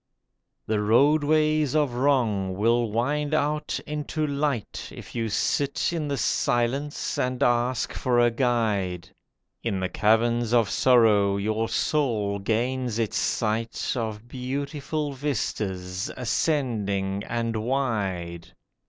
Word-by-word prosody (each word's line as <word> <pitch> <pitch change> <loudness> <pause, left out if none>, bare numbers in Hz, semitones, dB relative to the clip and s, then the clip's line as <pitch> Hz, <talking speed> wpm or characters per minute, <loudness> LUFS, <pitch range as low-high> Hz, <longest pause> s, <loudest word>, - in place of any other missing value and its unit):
The 110 -1 0
Roadways 150 +5 +3
of 145 -5 +2
Wrong 120 -8 +1
will 115 +2 +2
wind 145 +7 0
out 150 0 -1
into 150 +1 -2
light 140 -5 -2
If - - -11
you 115 -2 -2
sit 140 +9 0
in 160 -3 -2
the 140 -1 -2
silence 130 +6 0
and 125 +1 0
ask 120 -1 +1
for 125 -1 +1
a 120 0 +4
Guide; 105 -8 0 0.5
In 100 -5 -1
the 95 0 -1
caverns 115 +3 +2
of 115 -4 +3
sorrow 105 -6 +4
your 110 +2 -1
soul 110 -8 0
gains 120 +3 -1
its 115 -1 -1
sight 115 +1 -1
Of 110 -2 -4
beautiful 140 +4 -3
vistas, 100 -9 -3
ascending 105 -8 -1
and 115 -1 -1
wide. 105 -9 -2
120 Hz, 115 wpm, -25 LUFS, 105-140 Hz, 0.5 s, a